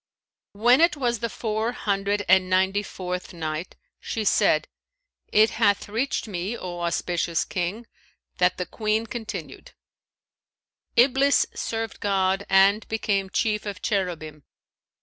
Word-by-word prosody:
When 240 Hz, +7 st, +4 dB
it 335 Hz, -2 st, +4 dB
was 240 Hz, -4 st, 0 dB
the 230 Hz, -, -2 dB
Four 220 Hz, +2 st, -2 dB
Hundred 200 Hz, -2 st, -1 dB
and 185 Hz, 0 st, +4 dB
Ninety 190 Hz, +2 st, +2 dB
fourth 180 Hz, -2 st, -6 dB
Night, 160 Hz, +1 st, -4 dB, 0.2 s
She 220 Hz, -, -3 dB
said, 205 Hz, -, +3 dB, 0.6 s
It 215 Hz, +1 st, +5 dB
hath 205 Hz, 0 st, +1 dB
reached 230 Hz, +4 st, -2 dB
me, 195 Hz, +3 st, -3 dB
O 175 Hz, -1 st, -6 dB
auspicious 170 Hz, -1 st, -1 dB
King, 190 Hz, +6 st, -3 dB, 0.5 s
that 180 Hz, 0 st, +3 dB
the 180 Hz, -, -2 dB
Queen 215 Hz, +2 st, -1 dB
continued: 230 Hz, -1 st, -7 dB, 1.2 s
"'Iblis 270 Hz, +3 st, +4 dB
served 225 Hz, -1 st, -4 dB
God 195 Hz, 0 st, 0 dB
and 195 Hz, +3 st, +4 dB
became 200 Hz, -3 st, -1 dB
chief 210 Hz, +1 st, -1 dB
of 200 Hz, 0 st, -6 dB
Cherubim. 165 Hz, -7 st, -2 dB
200 Hz, 125 wpm, -25 LUFS, 185-225 Hz, 1.2 s, It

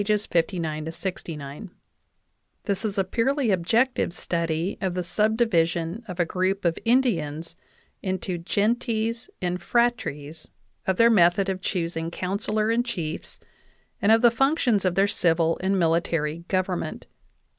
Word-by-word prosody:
59 170 Hz, -6 st, -1 dB
69); 165 Hz, -1 st, -6 dB, 0.9 s
this 200 Hz, +1 st, -2 dB
is 210 Hz, -2 st, -2 dB
a 195 Hz, -, +3 dB
purely 245 Hz, +5 st, +1 dB
objective 220 Hz, +4 st, +1 dB
study 170 Hz, +1 st, -2 dB
of 185 Hz, -2 st, -1 dB
the 180 Hz, -, -1 dB
subdivision 185 Hz, -2 st, +1 dB
of 180 Hz, -2 st, -7 dB
a 175 Hz, -, +3 dB
group 185 Hz, +3 st, -1 dB
of 165 Hz, -1 st, +1 dB
Indians 165 Hz, -, +1 dB, 0.5 s
into 185 Hz, -2 st, -2 dB
gentes 225 Hz, +4 st, -1 dB
and 180 Hz, 0 st, -1 dB
phratries, 165 Hz, -11 st, -1 dB, 0.4 s
of 190 Hz, -1 st, +1 dB
their 230 Hz, 0 st, +6 dB
method 190 Hz, -1 st, +4 dB
of 185 Hz, -1 st, -3 dB
choosing 165 Hz, -3 st, -2 dB
councillor 210 Hz, +5 st, -1 dB
and 235 Hz, +1 st, +2 dB
chiefs, 170 Hz, -10 st, -5 dB, 0.6 s
and 205 Hz, -, +4 dB
of 225 Hz, +1 st, +5 dB
the 240 Hz, -, +7 dB
functions 245 Hz, -, +2 dB
of 180 Hz, -1 st, +1 dB
their 195 Hz, +1 st, +4 dB
civil 165 Hz, -4 st, +1 dB
and 190 Hz, +1 st, +1 dB
military 165 Hz, -1 st, 0 dB
government. 185 Hz, -4 st, -2 dB
185 Hz, 130 wpm, -25 LUFS, 170-220 Hz, 0.9 s, the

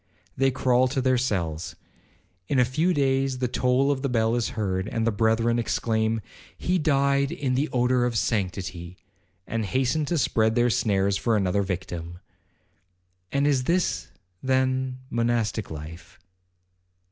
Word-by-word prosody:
They 135 Hz, 0 st, +3 dB
crawl 130 Hz, -1 st, +2 dB
to 135 Hz, +2 st, -2 dB
their 130 Hz, -1 st, +2 dB
cells,—in 90 Hz, -, -5 dB
a 125 Hz, -, +5 dB
few 155 Hz, +9 st, +1 dB
days 135 Hz, -3 st, +1 dB
the 125 Hz, 0 st, 0 dB
toll 125 Hz, +2 st, +2 dB
of 135 Hz, -2 st, -1 dB
the 140 Hz, -, -1 dB
bell 115 Hz, -2 st, +1 dB
is 120 Hz, -1 st, 0 dB
heard, 95 Hz, -2 st, -1 dB
and 115 Hz, 0 st, -1 dB
the 115 Hz, -, +2 dB
brethren 115 Hz, +2 st, +2 dB
exclaim, 110 Hz, -1 st, 0 dB, 0.4 s
'He 180 Hz, +1 st, 0 dB
died 140 Hz, -2 st, +2 dB
in 135 Hz, -3 st, -2 dB
the 140 Hz, +5 st, 0 dB
odour 125 Hz, 0 st, +2 dB
of 120 Hz, -2 st, -1 dB
sanctity,' 90 Hz, -5 st, -2 dB, 0.5 s
and 115 Hz, 0 st, -2 dB
hasten 130 Hz, +7 st, 0 dB
to 170 Hz, +4 st, -1 dB
spread 110 Hz, -5 st, +2 dB
their 120 Hz, 0 st, +3 dB
snares 100 Hz, -2 st, +1 dB
for 115 Hz, 0 st, +1 dB
another 100 Hz, 0 st, +1 dB
victim.' 85 Hz, -3 st, -5 dB, 1.1 s
'And 140 Hz, +1 st, +1 dB
is 135 Hz, -3 st, +2 dB
this, 175 Hz, +4 st, 0 dB, 0.3 s
then, 130 Hz, 0 st, 0 dB
monastic 115 Hz, -3 st, 0 dB
life?' 80 Hz, +4 st, -9 dB
120 Hz, 145 wpm, -25 LUFS, 100-130 Hz, 1.1 s, a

